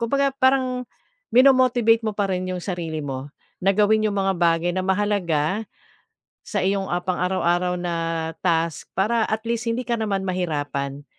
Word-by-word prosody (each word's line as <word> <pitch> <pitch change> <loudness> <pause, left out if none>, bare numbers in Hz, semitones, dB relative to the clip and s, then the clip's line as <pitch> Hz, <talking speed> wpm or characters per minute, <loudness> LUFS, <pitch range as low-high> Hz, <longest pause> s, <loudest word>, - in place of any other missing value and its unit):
kumbaga 275 +4 +1
parang 260 -2 +2 0.5
mino-motivate 250 -3 +5
mo 215 - 0
parin 190 -3 -1
'yung 185 -1 -3
sarili 170 -5 -4
mo 135 0 -5 0.3
na 195 - +4
gawin 215 +1 +3
'yung 205 - -3
mga 195 -1 +1
bagay 170 0 +2
na 185 - 0
mahalaga 190 -2 0 0.8
sa 205 -5 -2
iyong 195 0 0 0.2
pang-araw-araw 180 -1 0
na 175 -1 -2 0.5
task 165 -2 0
para 220 +4 +2
at 215 0 -2
least 235 0 -2
hindi 235 +2 -1
ka 235 - +1
naman 200 -3 -1
mahirapan, 145 -6 -3
195 Hz, 145 wpm, -23 LUFS, 175-225 Hz, 0.8 s, mino-motivate